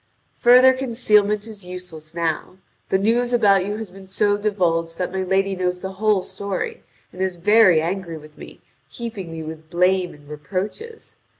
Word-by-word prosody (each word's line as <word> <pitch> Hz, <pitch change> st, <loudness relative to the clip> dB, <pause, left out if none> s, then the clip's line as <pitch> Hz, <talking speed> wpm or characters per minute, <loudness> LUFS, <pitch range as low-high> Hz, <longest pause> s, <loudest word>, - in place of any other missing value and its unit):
"Further 255 Hz, +2 st, +7 dB
concealment 210 Hz, -5 st, +2 dB
is 215 Hz, -3 st, -8 dB
useless 180 Hz, -3 st, -9 dB
now. 170 Hz, +2 st, -2 dB, 0.3 s
The 190 Hz, -, +3 dB
news 235 Hz, +5 st, +1 dB
about 200 Hz, -5 st, +4 dB
you 205 Hz, +1 st, -3 dB
has 220 Hz, -4 st, -7 dB
been 190 Hz, 0 st, -13 dB
so 205 Hz, +2 st, +2 dB
divulged 175 Hz, -6 st, 0 dB
that 180 Hz, -1 st, -2 dB
my 190 Hz, 0 st, -2 dB
lady 195 Hz, +1 st, +1 dB
knows 180 Hz, -1 st, -1 dB
the 190 Hz, -, -5 dB
whole 205 Hz, 0 st, +1 dB
story 200 Hz, -1 st, -4 dB, 0.3 s
and 180 Hz, -, -7 dB
is 190 Hz, -1 st, 0 dB
very 185 Hz, -2 st, +5 dB
angry 170 Hz, -1 st, -3 dB
with 155 Hz, 0 st, -14 dB
me, -, -, -12 dB, 0.3 s
heaping 220 Hz, -8 st, -6 dB
me 160 Hz, -1 st, -6 dB
with 155 Hz, 0 st, -9 dB
blame 180 Hz, +1 st, +1 dB
and 145 Hz, -1 st, -19 dB
reproaches. 195 Hz, -, -6 dB
190 Hz, 170 wpm, -22 LUFS, 175-210 Hz, 0.3 s, Further